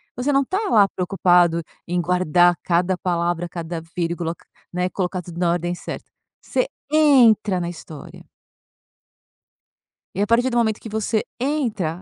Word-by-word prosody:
você 255 +4 -1
não 275 0 +3
tá 375 +8 -2
lá 210 -4 +5
preocupado 180 -2 +2 0.3
em 175 +1 -1
guardar 175 0 +3
cada 180 +1 +1
palavra, 175 -1 -1
cada 170 -1 -5
vírgula, 170 -1 -2
c - - -24 0.3
né, 180 +1 0
colocar 185 -1 -3
tudo 170 -1 -11
na 175 -1 +2
ordem 175 0 -1
certa, - - -8 0.3
você - - -1 0.2
entra 235 -10 +5
na 170 -1 -3
história. 160 -3 -11 1.9
E - - -4
a 205 - +1
partir 245 +3 +4
do 240 - -1
momento 220 -2 +1
que 225 - -8
você 220 0 -1 0.2
entra 235 - -2
180 Hz, 150 wpm, -22 LUFS, 175-220 Hz, 1.9 s, lá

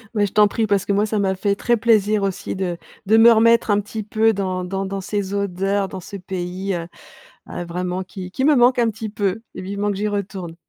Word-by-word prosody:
Beh, 205 -1 +3
je 200 - -6
t'en 210 -1 +5
prie, 220 +1 -1
parce 200 -2 +2
que - - -1
moi 200 +1 +2
ça 215 0 -1
m'a 190 -1 +1
fait 200 +1 0
très 240 +3 +1
plaisir 215 -2 +2
aussi 195 0 -3
de 180 -2 -2 0.3
de 215 +3 +4
me 230 +1 +8
remettre 230 0 +4
un 205 - +3
petit 210 +1 -5
peu 220 +2 +2
dans 185 -2 -2
dans 195 +1 -3
dans 195 0 -4
ces 200 0 -3
odeurs, 195 0 -1
dans 190 -1 -8
ce 200 - -8
pays, 185 +1 -4
heu, 170 -1 -5 0.6
heu, 175 - -5
vraiment 180 +2 -3
qui 185 -1 -8
qui 260 +8 -1
me 300 0 +5
manque 250 0 +4
un 235 -1 +3
petit 220 0 -6
peu, 205 0 -2
vivement 200 +2 -3
que 195 - -4
j'y 210 +1 -1
retourne. 195 -4 -4
200 Hz, 235 wpm, -21 LUFS, 190-215 Hz, 0.6 s, me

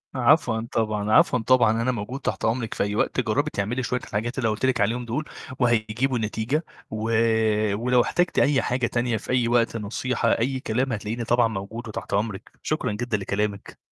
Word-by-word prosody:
عفواً 120 -4 +3
طبعًا، 110 -2 -1
عفواً 125 +3 +5
طبعًا، 115 -1 +3
أنا 130 +2 +1
موجود 120 +3 -5
تحت - - -2
أمرِك 115 0 -1
في - - 0
أي 105 +1 -2
وقت، - - 0
جربي 145 +7 0
تعملي 115 +6 -1
شوية 125 +1 -1
الحاجات 120 +3 -4
اللي 130 - -1
أنا - - +2
قولت 105 - -2
لك 130 -4 +1
عليهم 120 +4 0
دول 130 +7 -3 0.3
وهيجيبوا 120 +1 +1
نتيجة، 110 +8 -1 0.3
و 110 0 -3 0.7
ولو 125 +3 +3
احتاجتي 175 +8 +1
أي 140 -2 +3
حاجة 125 -1 0
تانية 120 -1 0
في - - -6
أي 125 -2 +2
وقت، 115 -1 +2
نصيحة 115 +4 -1
أي 130 +3 0
كلام 125 +2 -1
هتلاقيني 110 +3 -3
طبعًا 120 +1 +3
موجود 110 +3 -6
وتحت 110 - -6
أمرِك، 100 -1 -2
شكرًا - - -1
جدًا 110 +1 -2
لكلامِك. 100 +1 -4
115 Hz, 185 wpm, -24 LUFS, 110-125 Hz, 0.7 s, عفواً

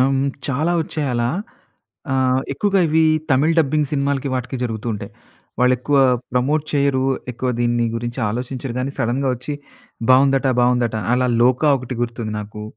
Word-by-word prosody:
ఆహ్, 130 - +4
హ్మ్, 135 +1 +1 0.2
చాలా 155 +6 0
ఒచ్చాయి 150 -3 -3
అలా 120 +1 +1 0.8
ఆహ్, 130 0 +2
ఎక్కువగా 195 +5 +1
ఇవి 160 +1 +3 0.3
తమిళ్ 150 +5 +3
డబ్బింగ్ 150 -1 +2
సినిమాలకి, 140 -1 0
వాటికి 130 +1 -3
జరుగుతూ 115 -1 -3
ఉంటాయి. 100 -1 -8 0.5
వాళ్ళు 125 0 +5
ఎక్కువ 140 +2 +1 0.3
ప్రమోట్ 140 +5 +1
చెయ్యరు, 140 -2 +2 0.3
ఎక్కువ 125 +2 -3
దీని 120 -1 +1
గురించి 120 +2 -5
ఆలోచించరు 125 +2 -4
కానీ, 135 +2 -2
సడెన్‌గా 130 +2 0
వచ్చి, 130 +4 -5 0.6
బాగుందట, 135 +1 +4
బాగుందట 120 -2 +2 0.2
అలా 125 0 +1
'లోక' 130 +4 +3
ఒకటి 125 0 -6
గుర్తుంది 115 -2 -3
నాకు. 105 +1 -8
130 Hz, 150 wpm, -20 LUFS, 120-140 Hz, 0.8 s, వాళ్ళు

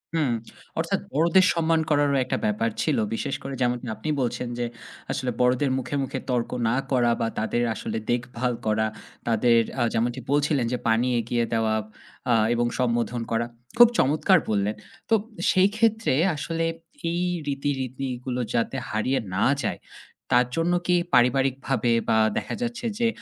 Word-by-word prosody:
হুম। 145 -6 +2 0.5
অর্থাৎ - - 0
বড়দের 170 +5 +4
সম্মান 165 -1 +2
করারও 145 -1 +3
একটা 130 - -2
ব্যাপার 105 +2 +1
ছিল। 155 - +1 0.2
বিশেষ 140 +4 -2
করে 135 0 -5
যেমনটি 120 0 0
আপনি 155 - -5
বলছেন 125 0 -2
যে 120 - 0 0.5
আসলে 130 -1 -1
বড়দের 130 +2 +2
মুখে, 130 +2 -3
মুখে 130 - -4
তর্ক 120 -2 0 0.2
না 120 - +1 0.2
করা 120 -2 +3
বা 115 - +1
তাদের 120 +2 0
আসলে - - -4
দেখভাল 125 0 -1
করা, 110 0 +2 0.4
তাদের 115 +1 +4 0.2
আ - - +1
যেমনটি 120 +3 0
বলছিলেন 145 -3 +2
যে - - +1
পানি 115 +3 +3
এগিয়ে 115 +1 0
দেওয়া 110 -1 +1 0.6
আ - - +5 0.2
এবং 120 0 +1
সম্বোধন 120 -1 0
করা 115 +1 +1 0.3
খুব 240 -1 +10
চমৎকার 155 +6 +4
বললেন। 105 0 0 0.3
তো - - +3 0.4
সেই 185 +1 +5
ক্ষেত্রে 225 - +2 0.2
আসলে 165 +2 -2 0.5
এই 175 +1 -1 0.3
রীতি, 140 0 -1
রীতিগুলো 125 -1 -4
যাতে 120 +3 0
হারিয়ে 120 +5 0 0.2
না 100 - +2 0.2
যায় 105 - -2 0.5
তার 125 0 +5
জন্য 170 +2 +2
কি 180 - +4 0.2
পারিবারিকভাবে 130 0 +2 0.2
বা 110 - +4 0.2
দেখা - - -3
যাচ্ছে 240 0 -3
যে 235 - +3
125 Hz, 155 wpm, -25 LUFS, 120-145 Hz, 0.6 s, খুব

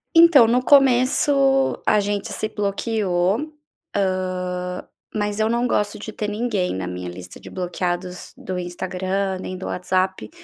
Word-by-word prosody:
Então, 330 -8 +8
no 250 +2 +2
começo 270 0 +4
a 210 - +4
gente 205 0 -2
se 215 - -2
bloqueou. 205 - -1 0.4
Hã, 180 -2 -2 0.3
mas 210 0 -2
eu 215 +1 +2
não 240 +1 +1
gosto 210 -1 0
de 215 +1 -7
ter 210 0 -4
ninguém 210 - -1
na 95 -1 -4
minha 90 0 -5
lista 90 +1 -10
de - - -11
bloqueados 180 0 -4
do 185 -1 -5
Instagram, 185 +2 -3
nem 185 0 -6
do 190 - -7
WhatsApp, 185 +1 -1
195 Hz, 145 wpm, -22 LUFS, 180-230 Hz, 0.4 s, Então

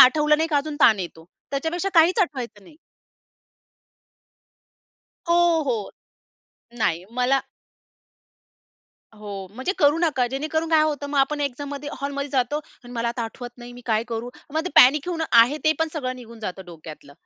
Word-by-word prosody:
आठवलं 300 +3 +6
नाही 320 +1 0
का 300 - +1
अजून 290 +1 -2
ताण 220 -6 +6
येतो, 165 -2 -7 0.3
त्याच्यापेक्षा 325 +7 -2
काहीच 335 +5 +5
आठवायचं 240 - -2
नाही. 300 - -17 2.5
हो, 340 -2 +4
हो. 225 -5 -2 0.9
नाही, 175 -6 0
मला 250 +2 +2 1.8
हो. 205 -3 -7
म्हणजे 260 +10 -2
करू 295 +2 +4
नका 290 -7 +1
जेणेकरून 315 +4 -2
काय 315 -1 +5
होतं 295 -2 -1
मग 285 - 0
आपण 290 +2 +1
एक्झॅाममध्ये, 285 +1 -4
हॉलमध्ये 280 0 -3
जातो 260 +2 0
आणि 265 -5 -11
"मला 235 0 -1
आता 235 0 -3
आठवत 240 +2 -7
नाही, 240 0 -10
मी 245 - -11
काय 220 -1 +2
करू" 235 +1 -4 0.2
मग 315 - +2
ते - - -3
पॅनीक 280 +6 +7
होऊन, 330 -2 -2
आहे 240 +6 +6
ते 310 - +5
पण 320 0 +1
सगळं 255 -4 -3
निघून 235 -2 -12
जातं 190 -2 -6
डोक्यातलं. 155 -4 -11
275 Hz, 155 wpm, -23 LUFS, 235-310 Hz, 2.5 s, पॅनीक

